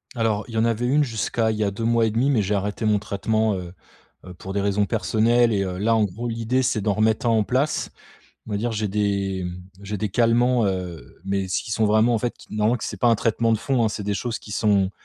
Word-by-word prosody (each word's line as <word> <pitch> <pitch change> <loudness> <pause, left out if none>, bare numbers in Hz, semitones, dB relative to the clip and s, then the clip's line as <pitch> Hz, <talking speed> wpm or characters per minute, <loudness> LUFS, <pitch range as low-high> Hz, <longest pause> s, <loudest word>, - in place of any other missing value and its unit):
Alors, 110 -3 0
il 120 - -10
y - - -3
en 110 - +3
avait 115 +1 0
une 145 +4 +3
jusqu'à 115 -2 -1
il 110 - -3
y 110 - 0
a 100 - 0
2 100 +4 -5
mois 115 0 +3
et 110 - 0
1/2 120 +6 +1
mais 125 -6 +3
j'ai 100 +2 -1
arrêté 105 +2 -2
mon 105 -1 +3
traitement, 110 +1 0
heu 90 -2 -7 0.5
heu, 90 - -9
pour 95 +2 -7
des 100 - 0
raisons 100 +1 +1
personnelles 115 +4 +2
et 100 -1 +1
heu, 90 -1 -4
là, 115 +3 +2
en 110 - +3
gros, 105 +5 -5
l'idée 115 +3 0
c'est 125 -4 0
d'en 105 0 +1
remettre 110 +2 +1
un - - +4
en 110 -2 +3
place. 130 +7 0 0.6
On - - -5
va 100 - 0
dire 120 +3 -1
j'ai 110 -1 -1
des, 100 -2 -1
mmh, 90 0 -6 0.2
j'ai 105 +1 -4
des 105 - -1
calmants, 120 +2 +2
heu, 90 -3 -5
mais 95 -1 -1
s'ils 95 +3 -2
sont 110 0 +2
vraiment 110 +3 +3
en - - +2
fait, 120 +2 -2
qui - - -12
normalement 110 +3 +2
que 115 - -7
c'est - - -5
pas 120 - +4
un 115 - +4
traitement 115 +2 +1
de 110 - +1
fond, 125 0 +1
hein, - - +2
c'est 105 -1 -5
des 100 0 -1
choses 115 +4 -3
qui 105 - -10
sont, 100 -3 +2
110 Hz, 270 wpm, -23 LUFS, 100-115 Hz, 0.6 s, un